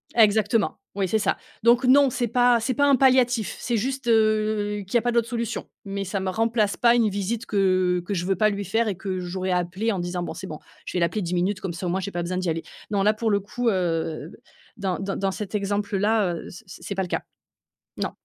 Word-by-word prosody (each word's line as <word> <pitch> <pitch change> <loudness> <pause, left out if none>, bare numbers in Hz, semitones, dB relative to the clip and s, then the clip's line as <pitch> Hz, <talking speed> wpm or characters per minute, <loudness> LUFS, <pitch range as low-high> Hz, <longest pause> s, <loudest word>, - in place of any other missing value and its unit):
exactement, 220 0 +3 0.2
oui 195 -2 0
c'est 220 +4 +1
ça. - - 0 0.3
Donc 240 +2 +5
non, 275 +1 +6
c'est 245 -1 -1
pas 245 0 +4
c'est 250 +3 -1
pas 285 +2 +2
un 275 - +6
palliatif, 250 -4 +3
c'est 240 -2 -1
juste, 265 +3 -3
heu, 215 -2 +2
qu'il 220 - -5
y - - +8
a 235 - +2
pas 240 - +1
d'autres 235 -1 +1
solutions. 235 -2 -3 0.2
Mais 195 0 -3
ça 195 +1 -2
me 190 0 -2
remplace 225 0 +1
pas 235 0 +5
une 225 -3 +3
visite 205 +4 -3
que 185 -3 +2
que 200 - -2
je 175 - -2
veux 195 +1 +1
pas 215 +4 +3
lui 200 -1 -3
faire 225 +4 +1
et 200 - -1
que 190 -1 -3
j'aurais 185 +1 -3
appelée 180 +5 0
en 190 - -2
disant: 175 0 -3
«Bon, - - -5
c'est 190 - -7
bon, 155 - -6 0.3
je - - -5
vais 180 - 0
l'appeler 205 +5 0
10 180 0 -2
minutes 185 +2 0
comme 185 -3 -3
ça 180 +2 -5
au - - 0
moins 185 +2 0
j'ai 195 +1 -4
pas 175 -1 -3
besoin 180 +1 -3
d'y 185 -2 -1
aller». 165 0 -2 0.3
Non 200 -2 +1
là, 210 +2 +4
pour 220 +1 -1
le 200 - +3
coup, 235 +4 -1
heu, 165 -4 -1 0.5
dans 190 -3 -1
dans 195 0 -3
dans 195 0 0
cet 210 +1 -6
exemple-là, 205 -1 +1
heu, - - -8
c 205 - -12
c 185 - -12
c'est 200 - -4
pas 190 - 0
le 180 - -4
cas. - - -1 0.8
Non. - - -2
205 Hz, 255 wpm, -24 LUFS, 185-230 Hz, 0.8 s, y